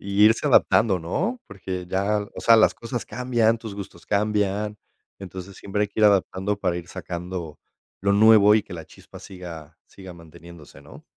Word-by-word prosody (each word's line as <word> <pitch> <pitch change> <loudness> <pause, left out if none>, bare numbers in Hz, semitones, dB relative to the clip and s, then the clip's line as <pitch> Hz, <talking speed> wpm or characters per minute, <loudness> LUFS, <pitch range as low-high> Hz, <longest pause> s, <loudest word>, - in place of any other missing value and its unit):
Y 100 +1 +2
irse 110 +1 +3
adaptando, 100 -5 +3
¿no? 190 - -3
Porque 90 -1 -7
ya, 100 +3 0 0.2
o - - -7
sea, 115 -1 +6
las 110 - +4
cosas 120 0 -6
cambian, 120 -3 0
tus 110 -3 -8
gustos 95 -4 -10
cambian. 105 0 -1 0.4
Entonces, 95 0 -9
siempre 105 +1 -3
hay 105 - -1
que 105 - -5
ir 105 - +5
adaptando 100 0 +1
para 90 -3 -1
ir 85 -1 -8
sacando 90 -2 -7 0.4
lo 100 +1 +1
nuevo 105 0 +6
y 105 - 0
que - - -10
la 80 -2 -8
chispa - - -15
siga 85 -5 -11
siga 95 -2 -12
manteniéndose, 85 -3 -15
¿no? 75 - -15
100 Hz, 175 wpm, -23 LUFS, 90-105 Hz, 0.4 s, sea